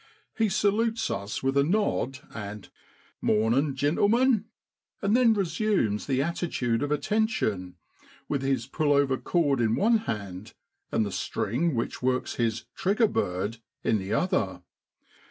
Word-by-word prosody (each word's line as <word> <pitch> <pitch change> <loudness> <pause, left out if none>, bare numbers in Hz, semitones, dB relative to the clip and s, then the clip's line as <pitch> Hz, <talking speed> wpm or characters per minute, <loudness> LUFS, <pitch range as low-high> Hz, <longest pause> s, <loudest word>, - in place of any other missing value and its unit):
He 220 -2 +2
salutes 220 +4 +1
us 100 +4 -4
with 135 +1 +1
a 140 - +5
nod 155 - 0
and 105 -2 -7 0.3
* - - -33
Mornin'! 120 +7 +2
gintlemen,' 210 - +3 0.5
and 205 +2 +2
then 240 -3 +5
resumes 185 - 0
the 135 -1 +1
attitude 140 -8 -1
of 145 0 -1
attention, 150 - 0 0.5
with 140 -2 -1
his 135 0 0
pull 150 -3 +1
over 140 -2 +3
cord 145 -7 +1
in 115 -1 +2
one 225 +2 +3
hand, 100 0 -5 0.4
and 110 - +1
the 100 - -4
string 135 - -1
which 115 - -3
works 130 0 0
his 115 -1 -1
* - - -59
trigger 210 +4 +2
bird 100 - -2
' - - -56
in 110 - +2
the 95 +1 -5
other. 100 - 0
140 Hz, 150 wpm, -27 LUFS, -, 0.5 s, a